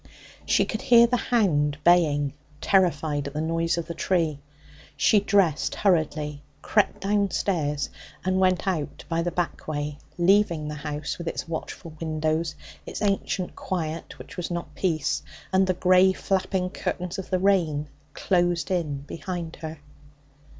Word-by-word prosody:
She - - +4
could - - -4
hear 235 -1 +7
the 240 +1 +1
hound 150 - +2
baying, 150 -5 +4 0.3
terrified 155 -7 +2
at 140 - -7
the - - -1
noise 165 +1 0
of 170 - -2
the 170 - -5
tree. 165 -4 0 0.6
She 210 - +5
dressed 195 -7 +2
hurriedly, 155 -6 +1 0.2
crept 210 -2 +1
downstairs 195 -7 0 0.3
and 185 0 +2
went 185 0 +2
out 165 -6 -2
by 165 0 0
the 175 - 0
back 175 -1 -3
way, 145 -1 -3 0.2
leaving 175 -4 +3
the 150 - -4
house, 150 +1 -4
with 170 - -6
its - - -3
watchful 165 0 -6
windows, 155 0 -1 0.3
its - - -5
ancient 195 -2 -1
quiet 165 -3 -4
which - - -11
was 180 - -3
not 170 -1 -4
peace, 160 -6 0 0.3
and 190 0 +4
the 185 - +1
grey, 185 +1 +5
flapping 185 -1 -1
curtains 180 -1 -3
of 190 - -7
the 185 - +2
rain 175 -6 +2 0.3
closed 175 0 +1
in 155 -6 -1
behind 165 +3 -6
her. 160 0 -6
170 Hz, 150 wpm, -25 LUFS, 155-185 Hz, 0.6 s, hear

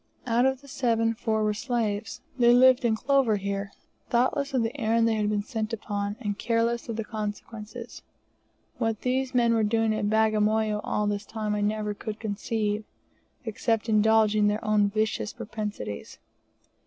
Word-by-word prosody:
Out 240 +1 +3
of 265 0 -1
the 280 - -16
seven, 230 -4 +1
four 220 -1 -1
were 210 0 +1
slaves. 220 -2 -2 0.2
They 240 0 +6
lived 255 0 +6
in 230 -2 +2
clover 270 -2 +2
here 200 0 -3 0.4
thoughtless 260 +4 +1
of 255 -3 +1
the 225 +4 -3
errand 230 +1 +3
they 225 - +2
had 210 -1 0
been 205 -1 0
sent 220 -1 -4
upon, 205 -2 -3
and 205 -4 -3
careless 235 0 0
of 230 - -2
the 225 - -2
consequences. 215 +2 -6 0.8
What 225 -3 -1
these 260 +1 -1
men 235 -1 +4
were 225 - +2
doing 220 +1 +2
at 210 -1 -1
Bagamoyo 215 0 +2
all 210 - -1
this 205 0 -2
time 215 -1 -3
I 210 - -1
never 210 0 -1
could 215 +1 -6
conceive, 210 0 -2 0.6
except 225 0 -1
indulging 215 -1 +4
their 210 +1 -1
own 210 -1 +3
vicious 215 0 -1
propensities. 210 - -6
220 Hz, 165 wpm, -27 LUFS, 210-230 Hz, 0.8 s, They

